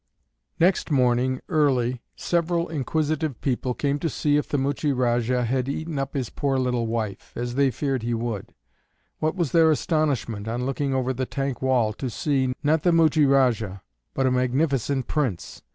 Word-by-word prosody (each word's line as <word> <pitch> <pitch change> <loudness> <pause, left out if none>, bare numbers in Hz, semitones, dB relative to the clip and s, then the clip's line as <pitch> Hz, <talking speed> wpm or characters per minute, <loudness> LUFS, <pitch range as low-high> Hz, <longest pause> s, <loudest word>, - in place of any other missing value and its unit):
Next 180 +2 +2
morning 130 -2 +2
early 130 -5 +1
several 170 0 0
inquisitive 155 -1 -1
people 125 -2 -1
came 145 0 0
to 165 - -1
see 145 +1 +1
if 150 - 0
the 145 - 0
Muchie 140 +2 0
Rajah 120 0 +1
had 130 +2 -1
eaten 155 +1 -3
up 135 +1 -4
his 130 -5 -2
poor 140 -2 0
little 125 -3 0
wife, 110 -4 -3
as 120 0 -3
they 140 +1 +3
feared 135 0 -2
he 120 +1 -1
would; 115 -3 -4 0.6
what 155 +2 0
was 170 -7 -1
their 165 -1 +5
astonishment, 140 -9 0
on 120 +2 -2
looking 135 +1 -1
over 130 0 0
the 130 0 -3
tank 135 -2 -3
wall, 125 -5 +2
to 130 +4 -4
see, 130 +1 0
not 150 +2 +3
the 175 - +3
Muchie 160 -3 +4
Rajah, 115 -8 +2 0.3
but 135 - +1
a 130 - +3
magnificent 130 +1 +1
Prince! 130 - -2
135 Hz, 170 wpm, -24 LUFS, 125-150 Hz, 0.6 s, their